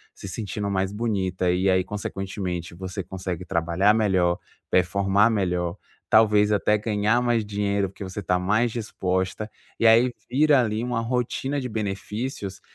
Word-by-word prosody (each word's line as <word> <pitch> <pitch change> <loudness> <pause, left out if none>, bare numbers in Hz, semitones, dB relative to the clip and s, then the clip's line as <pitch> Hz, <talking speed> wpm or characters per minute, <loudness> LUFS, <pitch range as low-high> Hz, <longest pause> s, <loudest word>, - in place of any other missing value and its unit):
se - - -9
sentindo 100 0 -4
mais 95 0 0
bonita 95 -5 0
e 90 +2 +2
aí, 95 0 +3
consequentemente, 95 -3 -4
você 95 +2 -5
consegue 90 -1 -5
trabalhar 85 +4 +2
melhor, 95 -5 +2 0.3
performar 100 +4 +3
melhor, 90 -4 -1 0.3
talvez 105 -1 +5
até 105 +1 +3
ganhar 105 +2 +1
mais 120 -3 +1
dinheiro, 100 -1 0
porque 100 - -10
você 95 +1 -6
está 90 0 +1
mais 105 +6 +1
disposta 95 -3 -2 0.3
E - - +1
aí 115 +3 +6 0.2
vira 145 +2 +4
ali 110 -2 0
uma 125 -2 -1
rotina 125 +4 -1
de 125 - -4
benefícios 105 0 -4
100 Hz, 145 wpm, -24 LUFS, 95-110 Hz, 0.3 s, aí